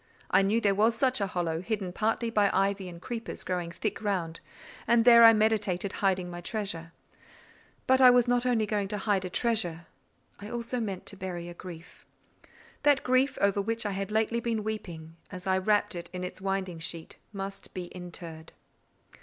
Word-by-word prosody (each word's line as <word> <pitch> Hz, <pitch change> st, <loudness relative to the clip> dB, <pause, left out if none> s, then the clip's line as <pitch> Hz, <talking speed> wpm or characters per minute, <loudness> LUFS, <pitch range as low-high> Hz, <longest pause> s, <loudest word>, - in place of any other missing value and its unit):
I -, -, +5 dB
knew 205 Hz, +4 st, +2 dB
there 205 Hz, -3 st, +2 dB
was 220 Hz, +3 st, +3 dB
such 255 Hz, -1 st, +1 dB
a 200 Hz, -, +1 dB
hollow, 170 Hz, -3 st, -2 dB
hidden 195 Hz, -3 st, -3 dB
partly 225 Hz, +3 st, 0 dB
by 210 Hz, -3 st, +3 dB
ivy 195 Hz, -1 st, 0 dB
and 170 Hz, -1 st, -10 dB
creepers 230 Hz, +4 st, -6 dB
growing 180 Hz, -2 st, -3 dB
thick 170 Hz, -, -3 dB
round; 180 Hz, -6 st, -2 dB, 0.5 s
and 235 Hz, 0 st, +4 dB
there 235 Hz, -1 st, +9 dB
I 225 Hz, -, +11 dB
meditated 210 Hz, -4 st, +1 dB
hiding 190 Hz, -2 st, +1 dB
my 175 Hz, 0 st, -7 dB
treasure. 175 Hz, -4 st, -4 dB, 0.9 s
But 260 Hz, 0 st, +4 dB
I 255 Hz, -, +10 dB
was 245 Hz, -1 st, +5 dB
not 245 Hz, 0 st, +2 dB
only 240 Hz, -4 st, +2 dB
going 205 Hz, -2 st, -1 dB
to 210 Hz, +1 st, -3 dB
hide 195 Hz, -2 st, 0 dB
a -, -, -3 dB
treasure—I 200 Hz, -2 st, -4 dB
meant 215 Hz, -, -7 dB
also 235 Hz, -4 st, -2 dB
to 200 Hz, -, -7 dB
bury 175 Hz, -2 st, -5 dB
a -, -, -8 dB
grief. 170 Hz, -1 st, -11 dB, 0.7 s
That 290 Hz, -2 st, +4 dB
grief 260 Hz, +2 st, +2 dB
over 200 Hz, 0 st, +3 dB
which 225 Hz, +2 st, -2 dB
I 205 Hz, -, 0 dB
had 195 Hz, 0 st, -3 dB
lately 220 Hz, +2 st, +1 dB
been 230 Hz, -2 st, -2 dB
weeping, 170 Hz, -7 st, -6 dB
as 180 Hz, -2 st, -8 dB
I 190 Hz, 0 st, +2 dB
wrapped 205 Hz, +2 st, +1 dB
it 170 Hz, -1 st, -6 dB
in 180 Hz, 0 st, -5 dB
its 180 Hz, +1 st, -6 dB
winding 190 Hz, -3 st, -2 dB
sheet, 165 Hz, 0 st, -6 dB
must 195 Hz, -1 st, -7 dB
be 180 Hz, -1 st, -4 dB
interred. 170 Hz, -3 st, -9 dB
200 Hz, 185 wpm, -29 LUFS, 180-225 Hz, 0.9 s, I